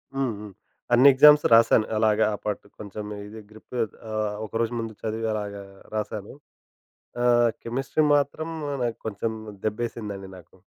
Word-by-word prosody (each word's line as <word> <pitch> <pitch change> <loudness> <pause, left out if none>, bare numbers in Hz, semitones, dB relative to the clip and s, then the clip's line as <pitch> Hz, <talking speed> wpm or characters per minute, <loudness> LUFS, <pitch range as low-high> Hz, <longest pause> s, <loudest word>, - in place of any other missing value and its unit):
హ్మ్. 135 -3 0
హ్మ్. 105 -2 -10 0.4
అన్ని 130 +4 +7
ఎగ్జామ్స్ 150 +2 +8
రాశాను. 115 -1 +6
అలాగా 110 0 +3
ఆ - - -1
పాటు 105 -1 -3
కొంచెం 105 0 -7 0.2
ఇది 110 +1 -10
గ్రిప్ 110 +3 -13 0.4
ఆహ్, 105 -1 -1
ఒకరోజు 115 +2 -2
ముందు 115 -1 -4
చదివి 110 +1 -2
అలాగా 100 -1 -5 0.3
రాశాను. 105 -1 -4 0.9
ఆహ్, 120 -1 +4
కెమిస్ట్రీ 135 +6 -1
మాత్రం 145 +3 -1 0.3
నాకు 115 -2 -2
కొంచెం 110 +2 -2 0.3
దెబ్బేసిందండి 105 -3 -4
నాకు. 85 +1 -17
110 Hz, 135 wpm, -25 LUFS, 105-120 Hz, 0.9 s, ఎగ్జామ్స్